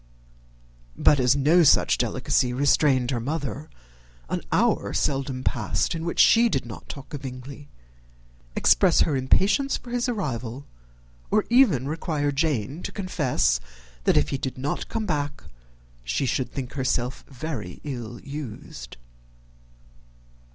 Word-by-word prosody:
But 145 Hz, -, +4 dB
as 125 Hz, +1 st, +4 dB
no 150 Hz, +6 st, +4 dB
such 155 Hz, -, +4 dB
delicacy 125 Hz, -1 st, +1 dB
restrained 135 Hz, -1 st, +3 dB
her 120 Hz, -, -1 dB
mother, 145 Hz, +2 st, -4 dB, 0.6 s
an -, -, -2 dB
hour -, -, +1 dB
seldom 135 Hz, -2 st, -1 dB
passed 105 Hz, -5 st, 0 dB
in 165 Hz, 0 st, -4 dB
which 170 Hz, -, -3 dB
she 235 Hz, +1 st, +6 dB
did -, -, -1 dB
not 115 Hz, -, -10 dB
talk 140 Hz, +1 st, -9 dB
of 145 Hz, -, -5 dB
Bingley, 135 Hz, +2 st, -9 dB, 0.9 s
express -, -, +4 dB
her 150 Hz, -, +2 dB
impatience 195 Hz, -, +2 dB
for 240 Hz, -, -12 dB
his 245 Hz, +1 st, 0 dB
arrival, 135 Hz, -, -4 dB, 0.6 s
or -, -, +2 dB
even 205 Hz, -, +4 dB
require 150 Hz, -1 st, -1 dB
Jane 145 Hz, -, -1 dB
to -, -, -5 dB
confess 150 Hz, -, 0 dB, 0.5 s
that -, -, +4 dB
if 75 Hz, -, +2 dB
he 135 Hz, -, -2 dB
did 130 Hz, -1 st, -4 dB
not 135 Hz, +3 st, -3 dB
come 220 Hz, -1 st, -2 dB
back 145 Hz, -4 st, -2 dB, 0.6 s
she -, -, -1 dB
should 130 Hz, 0 st, -1 dB
think 130 Hz, -2 st, -5 dB
herself 130 Hz, -1 st, -1 dB
very 135 Hz, -, -6 dB
ill 120 Hz, -5 st, -6 dB
used. 125 Hz, -, -8 dB
140 Hz, 135 wpm, -25 LUFS, 125-155 Hz, 0.9 s, she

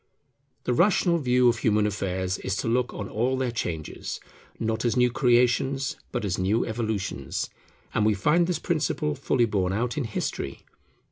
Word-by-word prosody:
The 125 Hz, -, 0 dB
rational 175 Hz, +2 st, +3 dB
view 125 Hz, -3 st, +3 dB
of 115 Hz, -2 st, +3 dB
human 105 Hz, -1 st, +2 dB
affairs 95 Hz, -2 st, -1 dB
is 95 Hz, -, -2 dB
to -, -, -2 dB
look 120 Hz, +2 st, +1 dB
on 100 Hz, -, -5 dB
all 125 Hz, +6 st, 0 dB
their 130 Hz, -2 st, 0 dB
changes, 80 Hz, -9 st, -4 dB, 0.4 s
not 110 Hz, 0 st, -1 dB
as 120 Hz, 0 st, +1 dB
new 125 Hz, 0 st, +4 dB
Creations, 130 Hz, +3 st, +2 dB, 0.2 s
but 120 Hz, -4 st, -2 dB
as 95 Hz, -2 st, -1 dB
new 100 Hz, +5 st, +2 dB
Evolutions. 110 Hz, -3 st, -3 dB, 0.4 s
And 110 Hz, -, +2 dB
we 105 Hz, 0 st, +3 dB
find 150 Hz, -, +3 dB
this 180 Hz, -, 0 dB
principle 75 Hz, -, 0 dB
fully 120 Hz, -, +1 dB
borne 95 Hz, -4 st, 0 dB
out 120 Hz, +7 st, -1 dB
in 135 Hz, -, -1 dB
history. 110 Hz, -, -4 dB
115 Hz, 165 wpm, -26 LUFS, 100-125 Hz, 0.4 s, new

